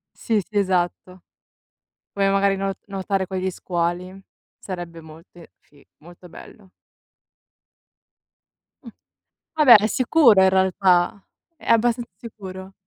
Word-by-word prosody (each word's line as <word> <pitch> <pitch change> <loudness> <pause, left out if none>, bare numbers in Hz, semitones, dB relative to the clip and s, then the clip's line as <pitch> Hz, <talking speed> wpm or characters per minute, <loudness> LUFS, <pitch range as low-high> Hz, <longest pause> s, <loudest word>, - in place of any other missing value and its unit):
Sì, 225 -2 -1
sì, 205 +3 -7
esatto. 185 -1 -2 0.9
Come 195 -1 0
magari 195 0 +1
no 195 0 -2
nuotare 195 -1 -3
con 190 0 -5
gli 185 0 -2
squali, 180 +2 -4 0.4
sarebbe 175 -3 -8
molte 160 +2 -16
fi 145 -1 -25
molto 175 +2 -16
bello. 195 +3 -15 2.1
Mh. - - -15 0.7
Vabbè, 295 -7 +7
è 210 0 +4
sicuro 245 -4 +4
in 190 - +5
realtà. 190 0 +1 0.3
È 325 - -10
abbastanza 235 0 +1
sicuro. 190 -4 -10
190 Hz, 110 wpm, -21 LUFS, 180-205 Hz, 2.1 s, Vabbè